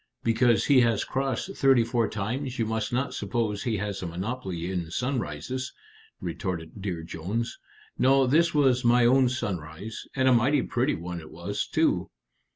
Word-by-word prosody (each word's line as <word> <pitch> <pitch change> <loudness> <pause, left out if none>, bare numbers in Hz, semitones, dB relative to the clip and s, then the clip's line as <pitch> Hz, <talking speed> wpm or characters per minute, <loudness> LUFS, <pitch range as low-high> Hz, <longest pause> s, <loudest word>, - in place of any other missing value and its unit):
"Because 115 0 +3
he 140 -3 +5
has 115 -3 +2
crossed 135 +8 -2
thirty 135 -3 +4
four 115 -2 0
times 125 +6 -3
you 115 - +1
must 110 -1 -2
not 130 +3 -1
suppose 110 -4 -2
he 115 -3 -1
has 100 -1 -3
a 90 - -3
monopoly 95 -1 -4
in 90 -3 -3
sunrises," 125 - -3 0.5
retorted 85 +1 -5
Dear 90 -4 -3
Jones. 100 +9 -4 0.4
"No; 135 +1 +5
this 165 +6 +3
was 135 -4 +3
my 120 0 +5
own 130 +1 +5
sunrise; 100 -4 -5
and 130 -1 +2
a 130 - +6
mighty 130 +4 +3
pretty 130 +4 0
one 85 +1 -5
it 80 - -11
was - - -4
too." - - +1
115 Hz, 165 wpm, -27 LUFS, 95-130 Hz, 0.5 s, a